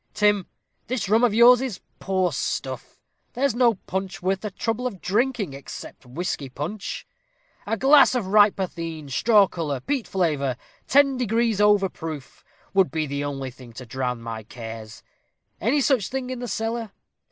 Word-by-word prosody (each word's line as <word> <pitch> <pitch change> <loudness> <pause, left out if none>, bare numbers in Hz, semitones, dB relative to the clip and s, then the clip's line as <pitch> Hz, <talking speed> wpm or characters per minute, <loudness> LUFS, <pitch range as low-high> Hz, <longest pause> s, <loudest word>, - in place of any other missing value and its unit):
Tim, 205 -3 +2 0.4
this 250 -4 -2
rum 220 +4 +3
of 245 - +5
yours 240 +3 +7
is 250 -8 -3 0.2
poor 185 -2 0
stuff 130 -2 -4 0.4
there's 270 0 +1
no 240 -1 +3
punch 190 0 -5
worth 190 +1 -1
the 210 - -3
trouble 225 +5 -2
of 195 -7 -7
drinking, 210 - 0
except 135 -1 -10
whisky 140 0 -4
punch. 160 +11 -5 0.6
A 225 - 0
glass 270 +2 +6
of 240 -5 0
right 205 +1 +5
potheen, 165 -5 -5
straw 210 - +5
color, 155 -7 -3
peat 260 - -2
flavor, 145 -9 0 0.3
ten 275 -1 +4
degrees 230 -3 +1
over 205 -2 +5
proof, 160 -6 -8 0.3
would 190 -2 +4
be 160 -1 -1
the 140 0 -3
only 135 -2 -4
thing 125 -2 -14
to 130 +2 -9
drown 125 -1 -3
my 115 -1 -5
cares. 115 -1 -9 0.6
Any 265 +8 +2
such 255 -8 +2
thing 260 -1 -3
in 255 - -4
the 245 - -4
cellar? 225 0 -3
195 Hz, 165 wpm, -24 LUFS, 145-235 Hz, 0.6 s, yours